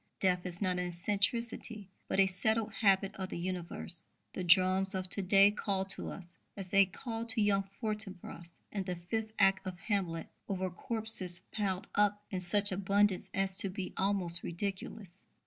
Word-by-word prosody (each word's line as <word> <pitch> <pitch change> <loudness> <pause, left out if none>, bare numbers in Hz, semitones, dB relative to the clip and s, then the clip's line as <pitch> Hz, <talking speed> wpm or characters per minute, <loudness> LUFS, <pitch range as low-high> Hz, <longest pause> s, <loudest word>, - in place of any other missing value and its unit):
Death 180 -1 +1
is 180 +3 -5
not 180 -2 0
an 180 - -2
eccentricity, 210 +4 -1 0.2
but - - -1
a 195 - +7
settled 220 +3 -1
habit 195 -2 +2
of 190 -1 -5
the - - -5
universe. 175 -1 -3 0.3
The 185 - -4
drums 185 +2 +3
of 185 0 -2
to 200 - -1
day 195 +2 +5
call 200 -2 -2
to - - -6
us, 175 -3 -11 0.2
as 195 -2 -5
they 195 -1 +5
call 225 +4 -6
to 225 - 0
young 195 -2 +1
Fortinbras 195 -6 -4
in 200 -2 -3
the 180 -1 -3
fifth 215 +6 -4
act 195 -1 +3
of 185 -1 -5
Hamlet, 185 -5 -2 0.2
over 185 -1 -2
corpses 210 -3 -3
piled 195 -3 -2
up 205 0 +2
in 185 - -2
such 200 +3 +3
abundance 195 0 +1
as 195 -1 -1
to 195 -1 +1
be 185 0 -6
almost 185 -3 +7
ridiculous. 195 +1 -6
195 Hz, 170 wpm, -32 LUFS, 180-205 Hz, 0.3 s, a